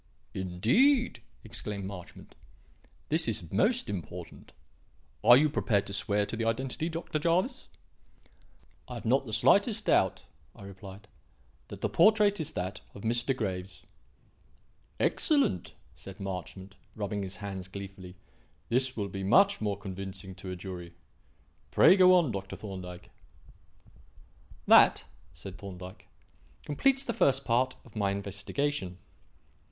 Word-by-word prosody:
"Indeed!" 125 - +2 0.2
exclaimed 105 -3 -5
Marchmont. 95 -3 -10 0.8
"This 160 +2 +1
is 95 -8 -3
most 235 +4 +2
important. 90 -6 -7 0.7
Are 120 +3 +9
you 155 +3 +4
prepared 110 -8 +1
to 100 - -7
swear 105 0 +1
to 115 - -5
the 115 - -2
identity, 130 +7 -1
Dr. 165 -2 -3
Jervis?" 180 - 0 1.2
"I - - -7
have - - -8
not - - +2
the - - -6
slightest 205 +2 +3
doubt," - - +2 0.3
I - - -13
replied, 100 +1 -11 0.6
"that - - -10
the - - +1
portrait 210 -2 +4
is 160 0 -4
that 95 +3 -4
of 100 - -10
Mr. 120 +3 0
Graves." 95 -4 -4 1.2
"Excellent!" 280 - +1 0.2
said 95 0 -11
Marchmont, 95 0 -6 0.2
rubbing 105 -1 -3
his 95 -1 -5
hands 95 -3 -6
gleefully; 95 -1 -9 0.5
"this 130 +1 +1
will 100 -2 -1
be 95 0 -6
much 195 - +4
more 105 -2 -1
convincing 95 -1 -7
to 95 - -9
a 90 - -4
jury. 90 -2 -8 0.7
Pray 185 - +6
go 185 -1 +7
on, 170 -8 +3
Dr. 95 -1 -5
Thorndyke." 90 -4 -8 1.5
"That," - - +6 0.3
said 95 +5 -9
Thorndyke, 95 -1 -10 0.6
"completes 270 - +2
the 235 - -2
first 135 -6 +2
part 130 +2 +1
of 115 - -18
my 100 -2 +1
investigation. 100 +2 -3
100 Hz, 130 wpm, -29 LUFS, 95-145 Hz, 1.5 s, Are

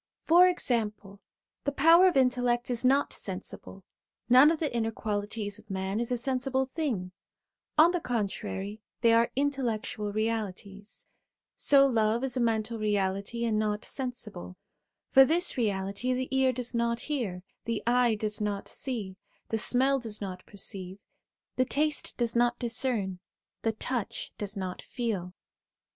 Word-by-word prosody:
For 350 +3 +7
example, 210 - -2 0.4
the 285 - 0
power 330 +6 +6
of 355 - +2
intellect 245 -1 +2
is 240 0 +1
not 270 +3 +3
sensible; - - -7 0.5
none 255 +4 +8
of 325 - +1
the 300 -6 -2
inner 225 -1 +1
qualities 210 -1 -3
of 215 0 -20
man 190 +2 -2
is 235 +1 -2
a 245 - +1
sensible 265 +1 0
thing; 260 - -3 0.7
on 320 +3 +7
the 355 - 0
contrary, 210 -3 -3 0.2
they 230 -1 +5
are 230 +1 +4
intellectual 245 -6 -1
realities; 210 -2 -4 0.5
so 275 -1 +5
love 230 -2 +2
is 265 -2 -1
a - - 0
mental 225 -1 0
reality 205 +2 -1
and 215 -2 +1
not 210 0 -1
sensible; 215 -8 -6 0.5
for 270 - +9
this 335 +6 +1
reality 205 +1 -1
the 255 +1 -2
ear 265 -1 +4
does 250 0 -3
not 235 0 0
hear, 220 -12 -3 0.2
the 230 -2 -2
eye 240 -1 +3
does 215 0 -3
not 205 -1 -2
see, 210 -8 -4 0.3
the 225 - 0
smell 265 +4 +3
does 225 -4 -5
not 185 -2 -6
perceive, 190 -2 -7 0.6
the 255 - +3
taste 300 +3 0
does 235 -1 0
not 240 0 +3
discern, 230 -6 0 0.4
the 225 - 0
touch 235 0 -4
does 205 0 -4
not 185 -1 -4
feel. 195 -7 -4
230 Hz, 150 wpm, -29 LUFS, 205-255 Hz, 0.7 s, for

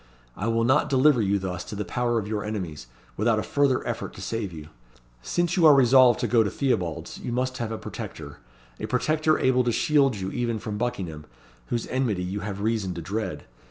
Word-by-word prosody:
I 105 - -3
will 115 0 +1
not 130 +5 +3
deliver 135 -1 +4
you 100 -1 +2
thus 90 -2 -4
to - - -7
the 105 0 -3
power 120 -1 0
of 105 -2 -2
your 105 -1 -2
enemies, 90 - -5 0.3
without 110 +1 +2
a 110 - -1
further 140 -2 +1
effort - - -4
to - - -9
save 115 -4 -3
you. 75 -2 -10 0.5
Since 175 - 0
you 170 -4 +6
are 150 - +8
resolved 130 -2 +6
to 120 - +1
go 115 +1 +4
to 105 - +1
Theobalds 90 - -2
you - - -5
must 130 +1 -1
have 115 -2 -3
a 110 - -3
protector - - -8 0.4
a - - -4
protector 155 +4 +1
able 130 -1 +3
to 120 - +1
shield 140 0 +3
you 95 -1 -4
even 120 -2 -1
from 105 0 -5
Buckingham, 90 -11 -4 0.4
whose 120 - -2
enmity 120 -8 -1
you 95 +3 -3
have 100 -1 -5
reason 105 -4 -1
to 85 - -5
dread. 95 -6 -4
115 Hz, 210 wpm, -25 LUFS, 100-130 Hz, 0.5 s, are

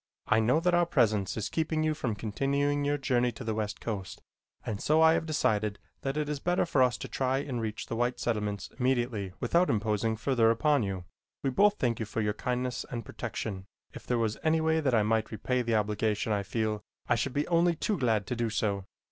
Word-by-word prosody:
I 110 - +3
know 120 +7 +3
that 175 +1 +1
our 175 -1 +4
presence 105 - +2
is 110 - -1
keeping 160 -1 -1
you 155 0 +2
from 125 -8 -2
continuing 140 +7 0
your 145 +1 +1
journey 125 -3 +1
to 125 - -8
the 110 -1 -1
west 105 -1 -3
coast, 100 -5 -5 0.5
and 105 -1 -3
so 155 +1 +3
I 160 0 +7
have 160 - -1
decided 105 -9 +1 0.2
that 135 +2 -2
it 150 -1 0
is 150 -1 -2
better 175 +4 +1
for 145 -5 +2
us 125 -2 +3
to - - -6
try 130 0 0
and 135 -4 -3
reach 110 -1 -4
the - - -4
white 120 +2 0
settlements 105 -4 -2
immediately 120 -7 0
without 175 +2 +2
imposing 110 +1 0
further 115 -1 +3
upon 145 +5 +3
you. 95 -3 -3 0.4
We 135 - +1
both 205 +9 +4
thank 120 -3 0
you 110 - -3
for 110 - -3
your 105 -1 +1
kindness 125 +1 -2
and 115 -3 -5
protection. 95 -3 -5 0.3
If - - -11
there 125 - +1
was 110 -2 -1
any 160 0 +2
way 160 0 +2
that 135 -6 +2
I 110 - +4
might 110 +1 +1
repay 125 +4 -1
the 115 -2 0
obligation 105 +1 0
I 100 - +1
feel, 110 +1 -2 0.3
I - - +3
should 120 +3 -1
be 145 +2 0
only 170 0 +3
too 200 +5 -1
glad 110 -6 +1
to 125 - -3
do 120 -1 -1
so. 100 -3 -1
120 Hz, 225 wpm, -29 LUFS, 110-145 Hz, 0.5 s, I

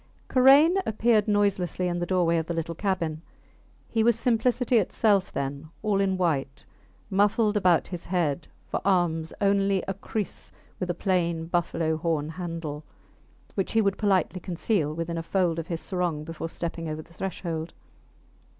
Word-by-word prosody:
Karain 280 +7 +6
appeared 220 - +2
noiselessly 195 -4 +1
in 175 0 -1
the 175 - -2
doorway 175 -3 +2
of 160 -1 -2
the 170 - -2
little 165 0 -2
cabin. 165 -4 -2 0.7
He 225 -1 +1
was 235 -1 +4
simplicity 245 +1 +2
itself 200 0 +2
then; 140 +2 -4
all 205 -2 +2
in 190 -1 +1
white; 150 -6 -1 0.5
muffled 210 +2 +3
about 180 -5 +3
his 175 -2 -7
head; 170 -4 -1 0.2
for - - -2
arms 170 -4 +1
only 195 -1 +2
a 195 - -1
kriss 200 +1 -5 0.3
with 185 - -3
a 175 - 0
plain 170 -3 0
buffalo 165 -2 0
horn 155 -2 -1
handle, 165 -3 -5 0.7
which 195 - -2
he 225 - +4
would 200 -1 0
politely 190 -3 +1
conceal 175 -2 -1
within 165 +1 -3
a - - -4
fold 170 -1 +1
of 165 - -5
his 165 -2 -3
sarong 175 -5 -2
before 165 +1 -5
stepping 165 -1 -4
over 155 0 -5
the 170 - -20
threshold. 165 -2 -4
180 Hz, 160 wpm, -26 LUFS, 165-200 Hz, 0.7 s, Karain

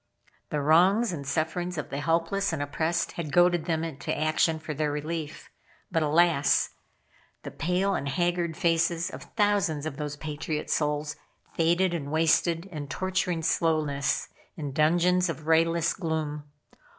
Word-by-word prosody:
The 150 - -1
wrongs 185 +9 +4
and 140 -4 -6
sufferings 170 +4 -2
of 150 - -5
the 140 - -3
helpless 165 +6 0
and 160 - -3
oppressed 160 +4 -1
had 160 -4 -5
goaded 175 0 +4
them 160 -3 -2
to - - -3
action 155 +1 +2
for 155 -1 -6
their 150 0 -1
relief. 155 +1 -5 0.4
But, 165 -2 +1
alas! 155 -1 +3 0.7
The - - -6
pale 185 +4 0
and 140 -6 -2
haggard 175 +1 0
faces 170 -1 +1
of - - -8
thousands 200 -8 +1
of 155 -3 -5
those 150 -1 -4
patriot 150 0 -4
souls 150 0 -1 0.4
faded 175 +2 +2
and 145 -4 -4
wasted 165 +2 +2
in 155 -7 -7
torturing 180 +1 -1
slowness 155 -4 0 0.3
in 145 -3 -4
dungeons 175 +5 +3
of 160 -1 -5
rayless 165 +1 +3
gloom. 155 -4 -3
160 Hz, 145 wpm, -27 LUFS, 150-175 Hz, 0.7 s, wrongs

